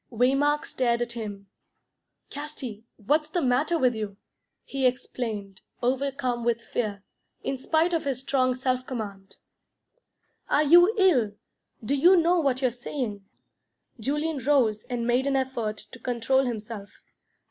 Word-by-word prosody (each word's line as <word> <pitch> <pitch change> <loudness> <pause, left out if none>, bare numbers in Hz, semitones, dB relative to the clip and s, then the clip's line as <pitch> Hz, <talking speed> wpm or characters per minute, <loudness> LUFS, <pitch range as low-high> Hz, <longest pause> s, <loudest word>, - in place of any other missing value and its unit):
Waymark 275 +5 +2
stared 240 -2 0
at 240 - -6
him. 210 -4 -6 0.9
"Casti, 275 -7 -7
what's 300 +8 +1
the 350 - 0
matter 275 +4 +2
with 255 -5 +3
you?" 210 -3 -5 0.5
he 270 -2 +1
exclaimed, 220 -6 -4 0.2
overcome 255 -1 0
with 235 -1 +1
fear, 210 -4 -3 0.4
in 275 - -1
spite 320 +6 +1
of 330 - 0
his 265 -3 -1
strong 255 -2 +1
self 255 0 -1
command. 200 -6 -6 1.1
"Are 295 - +4
you 350 +8 +6
ill? 275 - +4 0.5
Do 270 - 0
you 350 +7 +6
know 340 +1 +4
what 270 -4 0
you're 255 - +3
saying?" 235 -4 -5 0.7
Julian 295 +5 -1
rose 250 -7 +2
and 240 -2 -3
made 245 +3 +2
an 275 - +1
effort 240 -5 -1
to 255 - -11
control 250 +3 +1
himself. 220 -3 -5
255 Hz, 135 wpm, -26 LUFS, 230-280 Hz, 1.1 s, you